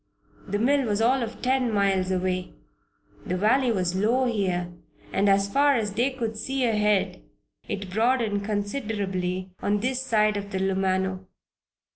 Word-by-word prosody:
The 205 - -1
mill 270 +4 +2
was 205 -1 0
all 250 +4 +3
of 230 0 -6
ten 255 -1 +1
miles 195 -3 +1
away. 185 -1 -2 0.7
The 180 - -2
valley 240 +6 +3
was 180 -4 0
low 230 +7 +2
here 185 -7 -1 0.4
and 200 +1 +3
as 195 0 +3
far 280 +6 +3
as 210 -4 -1
they 240 +6 +2
could 235 -4 -4
see 265 +3 -1
ahead 210 -3 +1 0.5
it 200 -2 -5
broadened 220 -1 +1
considerably 200 -4 -2
on 205 +1 +1
this 255 +2 -1
side 215 -4 +2
of 200 0 -5
the 190 - -3
Lumano. 190 0 0
205 Hz, 150 wpm, -25 LUFS, 190-240 Hz, 0.7 s, all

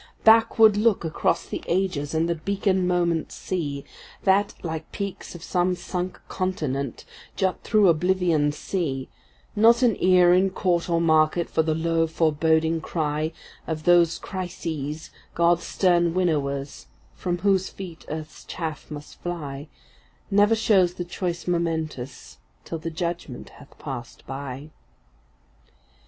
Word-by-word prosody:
Backward 225 -1 +6
look 210 -4 +2
across 160 - 0
the - - -5
ages 170 -5 -1
and 160 +1 +2
the 170 - +1
beacon 190 +2 0
moments 175 -2 0
see, 145 -7 -3 0.4
That, 200 +1 +3
like 160 -2 -5
peaks 200 -3 -5
of 170 - -10
some 180 0 +1
sunk 180 0 -4
continent, 145 - -3 0.3
jut 190 -1 0
through 210 -3 +3
Oblivion’s 165 -3 +2
sea; 140 -9 -3 0.5
Not 230 +3 +5
an 235 -5 +4
ear 180 -1 +6
in 185 +2 +4
court 180 -2 0
or 170 -1 +2
market 160 +1 +2
for 160 - +3
the 160 -1 0
low 165 0 +1
foreboding 160 0 +1
cry 155 -1 -2 0.4
Of 155 -1 -3
those 175 -1 +4
Crises, 160 -5 -5 0.2
God’s 170 0 +2
stern 175 -2 +2
winnowers, 140 - -1 0.3
from 175 -1 -2
whose 190 0 +1
feet 175 -5 -9
earth’s 155 0 -7
chaff 160 -3 -5
must 150 -1 -10
fly; 150 -5 -5 0.6
Never 205 +3 +5
shows 190 -5 +3
the 175 - -4
choice 175 0 -4
momentous 160 -6 -3 0.3
till 165 - -5
the 165 +1 -4
judgment 170 -5 -5
hath 145 - -17
passed 125 -5 -8
by. 135 +2 -7
170 Hz, 130 wpm, -24 LUFS, 155-185 Hz, 0.6 s, Backward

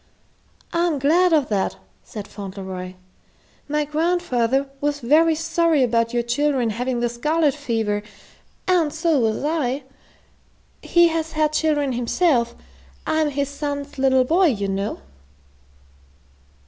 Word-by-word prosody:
"I'm 340 -2 +1
glad 335 +7 +3
of 300 -5 +2
that," 195 - 0 0.3
said 210 -2 -8
Fauntleroy. 190 -2 -7 0.7
"My 300 0 0
grandfather 290 -5 0
was 290 0 0
very 315 +6 +4
sorry 325 -2 +2
about 230 -1 +1
your 240 -1 0
children 255 -1 0
having 245 +2 -2
the 240 - +2
scarlet 300 +5 +1
fever, 225 -7 -2 0.7
and 345 -5 +2
so 320 -2 +1
was 225 0 0
I. 290 -3 -1 1.0
He 345 -1 +4
has 320 -1 -3
had 305 -1 +1
children 300 -3 +1
himself. 240 0 +1 0.5
I'm 315 -1 +1
his 280 -1 -2
son's 285 -1 -5
little 265 -1 +4
boy, 345 +8 +3
you 205 -8 0
know." 195 +1 -3
285 Hz, 120 wpm, -22 LUFS, 235-315 Hz, 1.0 s, very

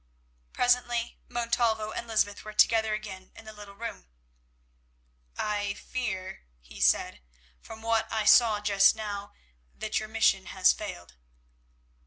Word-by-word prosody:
Presently 240 -1 0
Montalvo 230 -2 0
and 235 - -6
Lysbeth 215 -2 0
were 215 - -9
together 220 0 +4
again 190 -3 -9
in - - -13
the 215 - -10
little 205 -1 -12
room. 200 - -7 1.3
"I 205 -1 -2
fear," 190 - -5
he - - -13
said, 65 - +2 0.4
"from 220 0 -12
what 225 0 0
I 220 -1 -1
saw 220 -2 +5
just 200 -1 +4
now, 205 -2 -6 0.4
that 215 0 -2
your 215 0 -7
mission 215 -4 +2
has 185 0 +3
failed." 85 - -9
215 Hz, 130 wpm, -28 LUFS, 200-225 Hz, 1.3 s, saw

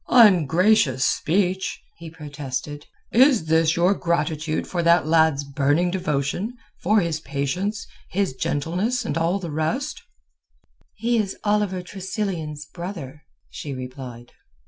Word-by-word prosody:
"Ungracious 180 - +5
speech!" 190 +2 0 0.2
he 165 -1 -9
protested. 145 -1 -6 0.2
"Is 250 - +5
this 160 0 +3
your 175 +3 +4
gratitude 165 -3 -1
for 175 - -2
that 170 -2 +4
lad's 160 -3 +3
burning 145 +5 +1
devotion, 175 - -2 0.2
for 210 +3 +3
his 165 -3 -1
patience, 155 +10 -2 0.2
his 195 -5 0
gentleness, 180 - -1
and 145 - -2
all 165 +3 +1
the 175 -5 -6
rest!" 260 - -2 0.9
"He 230 +2 +1
is 200 -3 -2
Oliver 205 -3 +1
Tressilian's 180 -6 -4
brother," 160 -4 -7 0.3
she 140 -3 -6
replied. 125 -2 -8
170 Hz, 120 wpm, -23 LUFS, 145-195 Hz, 0.9 s, Ungracious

